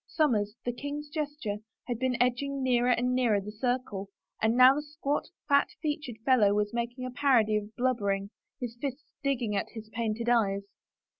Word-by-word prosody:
Somers, 215 -9 +1
the 245 - 0
king's 285 +3 -5
jester, 290 -8 -3 0.3
had 240 -2 -3
been 255 -2 0
edging 265 +3 +1
nearer 245 -1 +3
and 250 +1 +2
nearer 240 -5 +3
the 200 +2 -7
circle 220 -4 -2 0.3
and 220 +2 +2
now 255 +1 +9
the 295 - -2
squat, 295 -1 -2 0.2
fat 280 0 +4
featured 295 -6 -3
fellow 215 -6 +5
was 210 +1 0
making 240 +2 -3
a 255 - -4
parody 250 -6 +3
of 210 +1 -3
blubbering, 200 -6 0 0.3
his 240 -3 -4
fists 280 0 -5
digging 245 -7 0
at 195 - -1
his 220 -2 -8
painted 230 0 -2
eyes. 200 -5 +2
245 Hz, 170 wpm, -29 LUFS, 215-275 Hz, 0.3 s, now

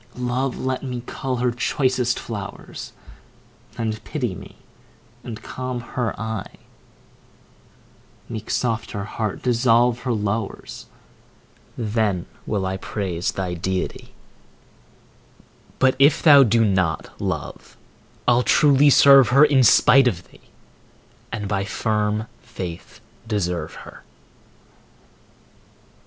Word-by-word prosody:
Love, 125 +1 -2
let 130 0 -2
me 125 -3 -5
cull 130 0 -4
her 125 0 0
choicest 125 0 0
flowers, 100 -3 -7 0.9
And 110 -1 -3
pity 125 -10 -3
me, - - -11 0.7
and 115 -3 -8
calm 130 -1 -5
her 120 0 -4
eye; 110 0 -5 1.7
Make 110 -3 -7
soft 115 -2 -1
her 100 -2 -4
heart, 110 0 -4
dissolve 120 0 +3
her 125 0 -3
lowers, 105 -1 -4 0.9
Then 105 -5 -1 0.2
will 100 -3 -1
I 95 0 -2
praise 95 -4 -3
thy 95 -2 -3
deity, 90 +2 -4 1.6
But 130 0 +2
if 145 +3 +4
thou 145 -3 +8
do 115 -2 +3
not, 95 -5 -1
Love, - - -5 0.5
I'll 120 0 +4
truly 145 +2 +4
serve 140 -2 +7
her 140 +5 +6
In 140 -3 +4
spite 130 +2 +6
of 90 -7 -3
thee, - - -22 0.8
and 105 - -4
by 100 -1 -1
firm 105 +1 -1 0.2
faith 95 -8 -8 0.3
deserve 90 -7 -2
her. - - -13
115 Hz, 110 wpm, -22 LUFS, 100-125 Hz, 1.7 s, thou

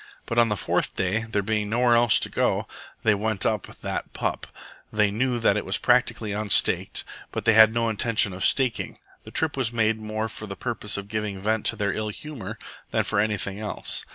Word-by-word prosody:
But 115 - 0
on 115 -1 +4
the 105 - -1
fourth - - -1
day, 100 +5 0
there 105 -2 0
being 105 0 -1
nowhere 120 +2 +3
else 120 -1 +5
to - - -1
go, - - 0 0.4
they 110 - +4
went 105 0 -1
up 110 -4 0
"that - - -5
pup." - - -3 0.4
They 105 -1 +2
knew 125 +4 0
that 115 - +3
it - - -1
was - - -2
practically 105 - +2
unstaked, 105 -1 +2 0.3
but - - -4
they 110 - +5
had 110 0 +8
no 115 0 0
intention 110 -2 +2
of 90 - -5
staking. 130 -4 +1 0.3
The - - -8
trip 160 -2 +1
was 130 -4 0
made 110 -1 +1
more 110 +1 -3
for 110 -1 -8
the 100 - -6
purpose 110 -3 -1
of 100 0 -6
giving 105 -2 -3
vent 110 +2 0
to - - +1
their 100 -2 -1
ill 110 0 -3
humour 115 -4 -7 0.3
than - - +1
for - - 0
anything 105 -1 -1
else. 105 -1 -2
110 Hz, 210 wpm, -25 LUFS, 105-115 Hz, 0.4 s, had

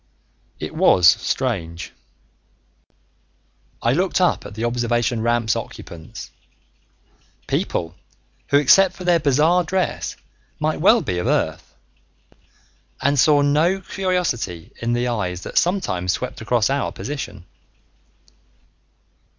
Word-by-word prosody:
It - - -5
was 90 - +4
strange. 90 -5 0 1.9
I 120 - +3
looked 180 +5 +1
up 180 -1 +1
at 100 - -12
the 110 +2 -2
observation 120 0 0
ramp's 115 -1 +1
occupants 80 -2 -8 1.1
people 85 -1 -2 0.5
who 140 - +4
except 185 +7 +5
for 185 - -9
their 175 -1 +3
bizarre 155 +5 +3
dress 185 +2 -2 0.4
might 155 0 -1
well 220 +6 +5
be 90 -3 -2
of 90 - -2
Earth - - -1 1.2
and 140 0 +1
saw 145 +1 +5
no 155 +7 +2
curiosity 180 - -2
in 115 0 0
the 120 +1 0
eyes 90 -7 -2
that - - +1
sometimes 90 - -1
swept - - -5
across 115 +1 +1
our 140 0 -1
position. 110 -10 -6
125 Hz, 110 wpm, -21 LUFS, 110-170 Hz, 1.9 s, except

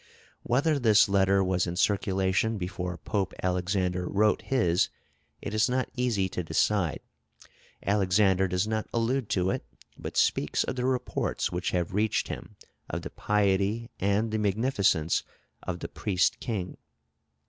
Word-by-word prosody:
Whether 140 +5 +1
this 110 -5 +5
letter 100 0 +3
was 90 -1 +1
in 85 - -3
circulation 95 +2 +1
before 90 -1 -4
Pope 100 0 -2
Alexander 90 0 0
wrote 105 +1 +2
his, 90 -10 +1 0.5
it 105 - -4
is 110 +2 +2
not 130 0 -1
easy 120 -7 +1
to 90 - -3
decide. 85 +1 +1 0.8
Alexander 95 -1 +3
does 90 +3 0
not 110 -1 -2
allude 115 0 0
to 95 -2 +1
it, - - -3 0.4
but - - -6
speaks - - +2
of - - -3
the 125 -1 -2
reports 130 -1 -1
which 90 +1 -2
have 90 -1 -1
reached 105 +1 +1
him - - -7 0.3
of - - -4
the - - -6
piety 105 +3 0
and 100 +3 +1
the 110 - 0
magnificence 100 - +1 0.4
of 90 -1 -5
the - - -3
Priest 95 -4 0
King. 100 -7 -4
100 Hz, 145 wpm, -28 LUFS, 90-110 Hz, 0.8 s, this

